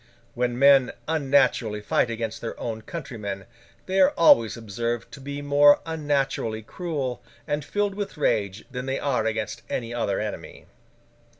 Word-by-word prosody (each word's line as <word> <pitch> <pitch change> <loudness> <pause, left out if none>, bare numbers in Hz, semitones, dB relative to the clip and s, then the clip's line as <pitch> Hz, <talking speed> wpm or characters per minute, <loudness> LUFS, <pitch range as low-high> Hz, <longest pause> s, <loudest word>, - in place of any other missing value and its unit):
When 120 0 -1
men 135 -1 +6
unnaturally 135 -8 +2
fight 105 +3 +1
against 115 -1 -4
their 115 - -5
own 110 -2 -4
countrymen, 105 - -6 0.4
they 190 +1 0
are 185 - +5
always 115 -10 +5
observed 115 +2 -3
to 140 - -11
be 140 +1 -6
more 145 0 +6
unnaturally 140 -8 -1
cruel 145 - -4 0.3
and 145 0 -1
filled 205 +5 -1
with 200 -3 -5
rage 105 -8 0
than 125 +1 -5
they 135 0 -1
are 125 -6 0
against 110 +2 -3
any 115 -1 -3
other 105 -5 -1
enemy. 105 -1 -6
125 Hz, 145 wpm, -25 LUFS, 110-145 Hz, 0.4 s, men